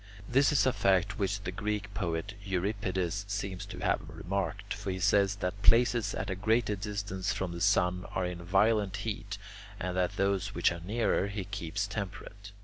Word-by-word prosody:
This 135 Hz, +4 st, +4 dB
is 145 Hz, -, +4 dB
a 130 Hz, -, +3 dB
fact 100 Hz, +1 st, +2 dB
which 100 Hz, +1 st, 0 dB
the 95 Hz, -, -3 dB
Greek 105 Hz, 0 st, -3 dB
poet 90 Hz, 0 st, -2 dB
Euripides 95 Hz, -1 st, -1 dB
seems 100 Hz, -2 st, -3 dB
to -, -, -8 dB
have -, -, +2 dB
remarked; 100 Hz, +2 st, -3 dB
for 100 Hz, 0 st, -5 dB
he 95 Hz, 0 st, -2 dB
says 100 Hz, +1 st, +3 dB
that 100 Hz, 0 st, -3 dB
places 120 Hz, +1 st, +4 dB
at -, -, -3 dB
a -, -, -1 dB
greater 110 Hz, +2 st, +2 dB
distance 100 Hz, -1 st, -3 dB
from 95 Hz, -4 st, -2 dB
the 85 Hz, 0 st, -6 dB
sun 90 Hz, +1 st, +3 dB
are 95 Hz, -, -1 dB
in 90 Hz, -1 st, -4 dB
a -, -, -9 dB
violent 100 Hz, +2 st, +3 dB
heat, 105 Hz, -1 st, -3 dB, 0.4 s
and 90 Hz, -1 st, -2 dB
that 90 Hz, -1 st, +1 dB
those 100 Hz, 0 st, 0 dB
which 85 Hz, -, +3 dB
are 85 Hz, -, -4 dB
nearer 105 Hz, 0 st, +1 dB
he 100 Hz, 0 st, -3 dB
keeps 100 Hz, 0 st, -3 dB
temperate. 100 Hz, 0 st, -6 dB
100 Hz, 185 wpm, -31 LUFS, 95-105 Hz, 0.4 s, This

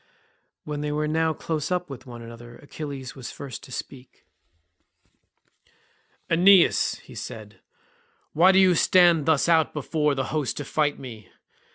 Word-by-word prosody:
When 150 Hz, -1 st, -5 dB
they 150 Hz, 0 st, -3 dB
were 150 Hz, +1 st, -1 dB
now 160 Hz, +1 st, +1 dB
close 155 Hz, -1 st, -4 dB
up 180 Hz, -1 st, -1 dB
with 130 Hz, -3 st, -10 dB
one 120 Hz, -1 st, -9 dB
another 115 Hz, +1 st, -12 dB
Achilles 140 Hz, -2 st, -8 dB
was 130 Hz, -3 st, -8 dB
first 135 Hz, -5 st, -8 dB
to 130 Hz, -, -15 dB
speak. 130 Hz, +1 st, -9 dB, 2.0 s
"Aeneas," 180 Hz, +2 st, +4 dB
said 110 Hz, -4 st, -8 dB
he, -, -, -27 dB, 0.7 s
"why 180 Hz, +5 st, +5 dB
do 190 Hz, -, +2 dB
you 190 Hz, -1 st, +5 dB
stand 170 Hz, -2 st, +4 dB
thus 160 Hz, -2 st, +2 dB
out 165 Hz, -2 st, +3 dB
before 150 Hz, 0 st, 0 dB
the 135 Hz, -, -1 dB
host 150 Hz, -5 st, -2 dB
to 145 Hz, -, -5 dB
fight 145 Hz, 0 st, 0 dB
me? 115 Hz, -7 st, -11 dB
150 Hz, 150 wpm, -24 LUFS, 130-160 Hz, 2.0 s, why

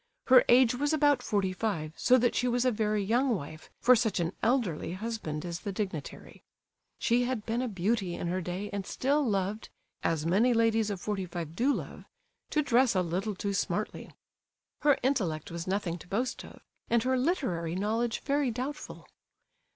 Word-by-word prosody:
Her 255 Hz, -1 st, +7 dB
age 245 Hz, -1 st, +6 dB
was 290 Hz, +5 st, 0 dB
about 290 Hz, -4 st, +3 dB
forty 195 Hz, -5 st, 0 dB
five, 165 Hz, -7 st, -2 dB
so 255 Hz, -, +4 dB
that 245 Hz, -1 st, +2 dB
she 250 Hz, -, +1 dB
was 245 Hz, +1 st, +1 dB
a 255 Hz, -, +4 dB
very 210 Hz, -2 st, 0 dB
young 240 Hz, +4 st, +2 dB
wife 155 Hz, -2 st, -8 dB
for 250 Hz, +1 st, +6 dB
such 220 Hz, -5 st, 0 dB
an 170 Hz, +1 st, -1 dB
elderly 220 Hz, -, 0 dB
husband 185 Hz, -7 st, -4 dB
as 170 Hz, 0 st, -4 dB
the 200 Hz, -, -4 dB
dignitary. 190 Hz, -7 st, -6 dB, 0.6 s
She 245 Hz, +1 st, +2 dB
had 245 Hz, -4 st, -3 dB
been 230 Hz, +2 st, -1 dB
a 255 Hz, -, -1 dB
beauty 195 Hz, -2 st, -1 dB
in -, -, -5 dB
her 180 Hz, +2 st, -1 dB
day 185 Hz, +4 st, -4 dB
and 200 Hz, -1 st, -2 dB
still 280 Hz, +9 st, 0 dB
loved, 205 Hz, -2 st, -1 dB, 0.3 s
as 160 Hz, -2 st, 0 dB
many 220 Hz, +9 st, +3 dB
ladies 225 Hz, -1 st, +2 dB
of 200 Hz, -3 st, -3 dB
forty 195 Hz, -1 st, -3 dB
five 165 Hz, -2 st, -6 dB
do 255 Hz, +9 st, +2 dB
love, -, -, -5 dB, 0.4 s
to 300 Hz, -, +1 dB
dress 250 Hz, -3 st, +3 dB
a 185 Hz, -, +3 dB
little 190 Hz, +5 st, -2 dB
too 200 Hz, +2 st, -3 dB
smartly. -, -, -2 dB, 0.7 s
Her 290 Hz, -2 st, +4 dB
intellect 195 Hz, -, 0 dB
was 170 Hz, +1 st, -5 dB
nothing 185 Hz, -3 st, -2 dB
to -, -, -13 dB
boast 240 Hz, +7 st, -2 dB
of, -, -, -13 dB, 0.3 s
and 235 Hz, -1 st, +3 dB
her 260 Hz, +1 st, +1 dB
literary 250 Hz, -, -1 dB
knowledge 225 Hz, +4 st, -1 dB
very 280 Hz, -1 st, +1 dB
doubtful. 260 Hz, +6 st, -6 dB
215 Hz, 180 wpm, -29 LUFS, 185-250 Hz, 0.7 s, Her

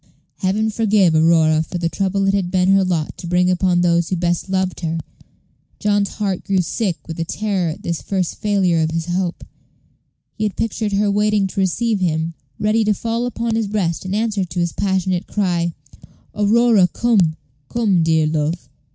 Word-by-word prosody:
Heaven 215 Hz, +3 st, 0 dB
forgive 210 Hz, -5 st, +3 dB
Aurora 160 Hz, -1 st, +4 dB
for 160 Hz, -, -5 dB
the 170 Hz, -1 st, -1 dB
trouble 195 Hz, +2 st, -1 dB
it 195 Hz, -, +2 dB
had 195 Hz, -3 st, 0 dB
been 185 Hz, 0 st, +2 dB
her 195 Hz, 0 st, +5 dB
lot 170 Hz, -5 st, -1 dB
to 175 Hz, -, -7 dB
bring 180 Hz, +1 st, +2 dB
upon 180 Hz, -1 st, +2 dB
those 170 Hz, -1 st, +2 dB
who 185 Hz, -, 0 dB
best 175 Hz, +1 st, -1 dB
loved 190 Hz, -1 st, -1 dB
her. 165 Hz, -1 st, -2 dB, 0.8 s
John's 205 Hz, -1 st, 0 dB
heart 195 Hz, -4 st, -2 dB
grew 190 Hz, -2 st, +1 dB
sick 185 Hz, +1 st, -2 dB
with 165 Hz, 0 st, -3 dB
terror 195 Hz, -5 st, -1 dB
at 155 Hz, -, -7 dB
this 170 Hz, -1 st, -3 dB
first 185 Hz, -3 st, -2 dB
failure 190 Hz, -5 st, +1 dB
of 160 Hz, -, +1 dB
his 165 Hz, 0 st, -2 dB
hope. 180 Hz, 0 st, -2 dB, 0.9 s
He 215 Hz, -, -4 dB
had 205 Hz, -4 st, -2 dB
pictured 220 Hz, -2 st, -2 dB
her 200 Hz, +1 st, +2 dB
waiting 210 Hz, 0 st, +2 dB
to 190 Hz, -, -4 dB
receive 210 Hz, +3 st, +1 dB
him, 165 Hz, -2 st, -1 dB, 0.3 s
ready 215 Hz, +1 st, +2 dB
to 210 Hz, -1 st, +2 dB
fall 230 Hz, +3 st, -2 dB
upon 230 Hz, -1 st, -2 dB
his 225 Hz, -2 st, 0 dB
breast 190 Hz, -5 st, -1 dB
in 185 Hz, +1 st, -3 dB
answer 215 Hz, -2 st, 0 dB
to 175 Hz, 0 st, -5 dB
his 170 Hz, -1 st, 0 dB
passionate 190 Hz, -2 st, -1 dB
cry, 175 Hz, -4 st, -1 dB, 0.6 s
"Aurora, 215 Hz, -1 st, +4 dB
come! 190 Hz, -6 st, +2 dB, 0.3 s
come, 210 Hz, -7 st, +2 dB
dear 160 Hz, -1 st, +3 dB
love! 155 Hz, -2 st, -2 dB
185 Hz, 180 wpm, -19 LUFS, 170-210 Hz, 0.9 s, her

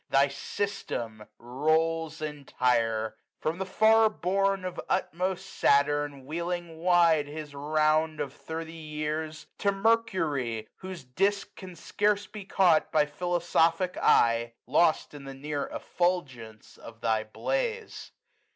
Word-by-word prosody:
Thy 140 Hz, +1 st, +4 dB
System 120 Hz, -, -4 dB
rolls 155 Hz, +5 st, 0 dB
entire: 120 Hz, -7 st, 0 dB, 0.2 s
from 160 Hz, +3 st, -2 dB
the 190 Hz, -, -3 dB
far 220 Hz, +3 st, +5 dB
bourne 195 Hz, -1 st, 0 dB
Of 180 Hz, -, -4 dB
utmost 185 Hz, +2 st, -1 dB
Saturn, 145 Hz, -5 st, +1 dB
wheeling 170 Hz, +1 st, -4 dB
wide 170 Hz, -4 st, +4 dB
his 150 Hz, 0 st, -7 dB
round 155 Hz, +2 st, +2 dB
100 -, -, 0 dB
Of 135 Hz, -, -8 dB
thirty 160 Hz, +2 st, -7 dB
years; 155 Hz, 0 st, -4 dB
to 200 Hz, -, +2 dB
Mercury, 165 Hz, -, 0 dB
whose 185 Hz, -5 st, -8 dB
disk 195 Hz, +11 st, -1 dB
Can 185 Hz, -2 st, -10 dB
scarce 205 Hz, +4 st, 0 dB
be 210 Hz, -3 st, -9 dB
caught 180 Hz, -5 st, +3 dB
by 150 Hz, -1 st, +4 dB
philosophic 175 Hz, +2 st, +1 dB
eye. 115 Hz, 0 st, +3 dB
Lost 155 Hz, +5 st, +2 dB
in 145 Hz, -1 st, -10 dB
the 135 Hz, 0 st, -8 dB
near 145 Hz, +1 st, -3 dB
effulgence 135 Hz, -12 st, -3 dB
of 115 Hz, 0 st, -12 dB
thy 110 Hz, -2 st, +1 dB
blaze. 470 Hz, -, -3 dB
155 Hz, 125 wpm, -28 LUFS, 140-185 Hz, 0.2 s, far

